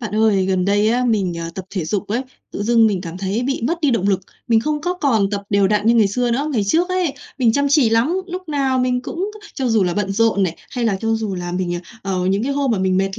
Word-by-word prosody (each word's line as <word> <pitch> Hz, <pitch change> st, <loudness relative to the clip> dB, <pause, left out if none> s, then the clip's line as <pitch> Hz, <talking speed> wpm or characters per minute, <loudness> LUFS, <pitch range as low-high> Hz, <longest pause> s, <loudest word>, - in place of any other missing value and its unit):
Bạn 215 Hz, -3 st, -5 dB
ơi, 215 Hz, -3 st, +3 dB
gần 185 Hz, -1 st, +1 dB
đây 205 Hz, +2 st, +2 dB
á, 245 Hz, +2 st, +1 dB
mình, 195 Hz, -8 st, 0 dB
à, 165 Hz, 0 st, -4 dB
tập 190 Hz, -, -6 dB
thể 185 Hz, -5 st, -3 dB
dục 200 Hz, +5 st, -2 dB
ấy, 235 Hz, +5 st, -1 dB, 0.3 s
tự -, -, -3 dB
dưng 230 Hz, +1 st, +4 dB
mình 200 Hz, -4 st, 0 dB
cảm 175 Hz, 0 st, -7 dB
thấy 200 Hz, +4 st, -1 dB
bị 270 Hz, -1 st, -2 dB
mất 335 Hz, +4 st, -1 dB
đi 295 Hz, -4 st, +2 dB
động 200 Hz, -4 st, +1 dB
lực. 195 Hz, -2 st, +2 dB, 0.3 s
Mình 225 Hz, -1 st, +4 dB
không 300 Hz, +4 st, -1 dB
có 355 Hz, +3 st, -1 dB
còn 230 Hz, -, +1 dB
tập 200 Hz, -1 st, -2 dB
đều 200 Hz, -1 st, +3 dB
đặn 210 Hz, 0 st, +1 dB
như 230 Hz, -, +5 dB
ngày 225 Hz, -3 st, +5 dB
xưa 245 Hz, +4 st, 0 dB
nữa. 275 Hz, +6 st, 0 dB
Ngày 220 Hz, -6 st, +1 dB
trước 330 Hz, -, +2 dB
ấy, 365 Hz, -6 st, 0 dB, 0.2 s
mình 235 Hz, -3 st, +3 dB
chăm 285 Hz, +3 st, +1 dB
chỉ 275 Hz, -5 st, +4 dB
lắm, 230 Hz, +9 st, +2 dB
lúc 365 Hz, -1 st, -7 dB
nào 270 Hz, -3 st, +1 dB
mình 250 Hz, 0 st, 0 dB
cũng 375 Hz, +10 st, -4 dB
c 415 Hz, -, -15 dB
cho 260 Hz, -2 st, -1 dB
dù 225 Hz, -3 st, +3 dB
là 175 Hz, -1 st, -1 dB
bận 205 Hz, -1 st, -1 dB
rộn 225 Hz, -1 st, +2 dB
này 170 Hz, -3 st, -1 dB
hay 245 Hz, -2 st, -2 dB
là 215 Hz, -4 st, +1 dB
cho 225 Hz, 0 st, +1 dB
dù 220 Hz, -3 st, -2 dB
là 175 Hz, -1 st, -5 dB
mình, 180 Hz, -1 st, -1 dB
à, 175 Hz, -, -3 dB, 0.2 s
ờ, 185 Hz, -2 st, -1 dB
những 195 Hz, +2 st, +1 dB
cái 275 Hz, +3 st, -1 dB
hôm 280 Hz, -2 st, 0 dB
mà 215 Hz, -, 0 dB
mình 185 Hz, 0 st, +1 dB
mệt 195 Hz, 0 st, -1 dB
220 Hz, 290 wpm, -20 LUFS, 195-260 Hz, 0.3 s, như